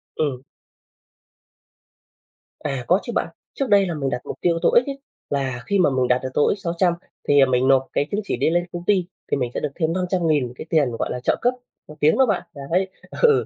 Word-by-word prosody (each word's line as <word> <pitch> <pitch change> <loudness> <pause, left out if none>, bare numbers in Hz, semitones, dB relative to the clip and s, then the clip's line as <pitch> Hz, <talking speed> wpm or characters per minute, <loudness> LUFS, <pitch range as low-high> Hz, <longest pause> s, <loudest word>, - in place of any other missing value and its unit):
Ừm. 140 -5 -1 2.2
À, 135 -4 -3
có 185 +3 +4
chứ 240 - -5
bạn. - - +1 0.3
Trước 275 -3 -2
đây 200 -1 +5
là 170 - -2
mình 140 -3 -2
đặt 125 - -3
mục - - -6
tiêu 170 -1 +2
TOEIC 240 - +4
ấy, 275 0 -5 0.3
là 130 -4 -2
khi 200 -1 +2
mà 175 - +5
mình 130 -1 +1
đạt 125 0 +2
được 130 - -2
TOEIC 150 - +2
600 175 -1 +1 0.3
thì, 145 -1 +5
à, 135 - +7
mình 130 0 +2
nộp 135 -1 +4
cái 145 - +1
chứng 205 +1 0
chỉ 185 - -2
đấy 140 +5 +2
lên 175 +1 +1
công 175 0 -5
ty 190 -3 +3 0.3
thì - - +2
mình 125 -2 -2
sẽ - - -2
được 150 - -2
thêm 165 -1 0
500.000 165 -9 0
cái 140 - -9
tiền, 150 -6 +2
gọi - - -1
là, 125 - -3
trợ - - +2
cấp 245 +1 +3 0.3
học 150 - -12
tiếng 155 - +4
đó 265 - +6
bạn, 210 -6 0 0.3
đấy. 190 +2 +2 0.3
Ừ, 470 -2 +5
160 Hz, 230 wpm, -22 LUFS, 135-185 Hz, 2.2 s, à